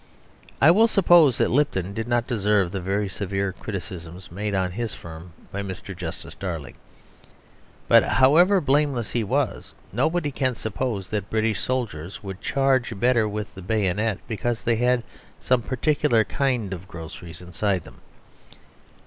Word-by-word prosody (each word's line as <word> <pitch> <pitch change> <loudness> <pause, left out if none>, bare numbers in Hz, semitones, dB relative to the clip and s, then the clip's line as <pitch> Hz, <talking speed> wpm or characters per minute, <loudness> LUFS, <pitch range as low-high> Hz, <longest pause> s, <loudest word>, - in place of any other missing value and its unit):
I 155 - +7
will 220 +6 +5
suppose 175 - +5
that - - +2
Lipton 100 -9 +1
did 115 +2 -4
not 120 -1 +1
deserve 105 -5 +1
the 95 -1 -3
very 100 +3 -1
severe 95 0 -2
criticisms 90 -4 -7
made 100 +3 -2
on 95 -1 0
his 115 +3 -4
firm 85 +1 -10 0.2
by 100 - -3
Mr. 95 -2 -7
Justice - - -7
Darling; 85 -7 -5 1.1
but, - - +7
however 170 +9 +5
blameless 140 - +1
he 120 - 0
was, 130 +4 -2 0.2
nobody 160 -2 +1
can 130 -2 0
suppose 110 -3 -3
that 105 -2 -2
British 110 -2 0
soldiers 100 -9 -3
would 95 -1 -7
charge 130 -5 +1
better 120 -2 +3
with 105 0 -5
the 95 - -10
bayonet 105 +1 0
because 115 +2 -2
they 115 -2 +2
had 125 0 +2 0.4
some 125 -1 +2
particular 130 -1 +2
kind 125 -5 -1
of 95 +1 -8
groceries 85 -1 -9
inside 90 +1 -1
them. - - -15
110 Hz, 150 wpm, -24 LUFS, 95-130 Hz, 1.1 s, I